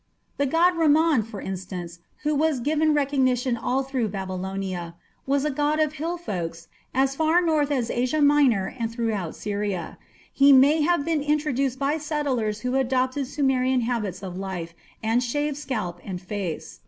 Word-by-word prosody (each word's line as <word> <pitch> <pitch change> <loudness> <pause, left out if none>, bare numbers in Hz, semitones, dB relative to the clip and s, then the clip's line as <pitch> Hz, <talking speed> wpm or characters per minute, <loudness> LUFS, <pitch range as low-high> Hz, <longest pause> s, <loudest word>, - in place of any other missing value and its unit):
The 280 - +1
god 335 +6 +4
Ramman, 315 -5 +3
for 215 -3 -8
instance, 180 -3 -6 0.2
who 300 0 +1
was 300 -2 +1
given 305 +4 +2
recognition 260 -3 +1
all 250 +3 -1
through 260 -4 -1
Babylonia, 190 -2 -4 0.3
was 280 +1 +1
a 300 - +1
god 295 +2 0
of 305 -1 +1
hill 330 +3 -3
folks 170 - -5 0.2
as 270 +1 +1
far 320 +3 +3
north 310 -4 +1
as 255 -5 0
Asia 255 +5 0
Minor 285 -10 +3
and 230 -1 -2
throughout 220 -8 -2
Syria. 205 -3 -3 0.3
He 275 +1 +6
may 280 +4 +6
have 335 -1 +2
been 325 -3 0
introduced 285 -3 0
by 285 +3 0
settlers 270 -9 -1
who 250 +2 -2
adopted 260 +1 0
Sumerian 260 -2 +1
habits 210 -6 -2
of 185 -2 -6
life 180 -4 -5 0.3
and 225 +2 +2
shaved 290 +4 -1
scalp 215 -12 -4
and 185 -3 -5
face. 180 -3 -5
260 Hz, 160 wpm, -25 LUFS, 205-295 Hz, 0.3 s, He